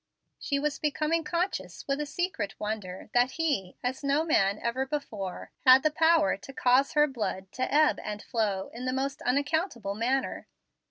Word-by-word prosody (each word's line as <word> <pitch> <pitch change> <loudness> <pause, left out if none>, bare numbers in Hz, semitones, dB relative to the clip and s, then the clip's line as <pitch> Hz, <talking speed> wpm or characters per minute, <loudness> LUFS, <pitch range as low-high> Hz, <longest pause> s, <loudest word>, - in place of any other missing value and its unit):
She 280 - -1
was 295 +1 -1
becoming 310 +2 0
conscious, 315 - -3
with 275 +1 0
a 295 - -3
secret 285 - -3
wonder, 210 -2 -5
that 245 +2 +3
he, 285 - -1
as 255 +3 -2
no 280 +3 +2
man 200 -11 +2
ever 235 +4 -1
before, 220 -10 -5
had 260 +1 +8
the 310 - +3
power 320 -1 +3
to 270 - -11
cause 255 +2 +3
her 295 0 +5
blood 210 -8 -4
to 255 - -2
ebb 305 +1 +4
and 210 0 -5
flow 210 -5 -1
in 245 +2 -6
the 255 - 0
most 270 +1 -2
unaccountable 280 - 0
manner. 250 +6 -1
265 Hz, 170 wpm, -28 LUFS, 215-300 Hz, -, had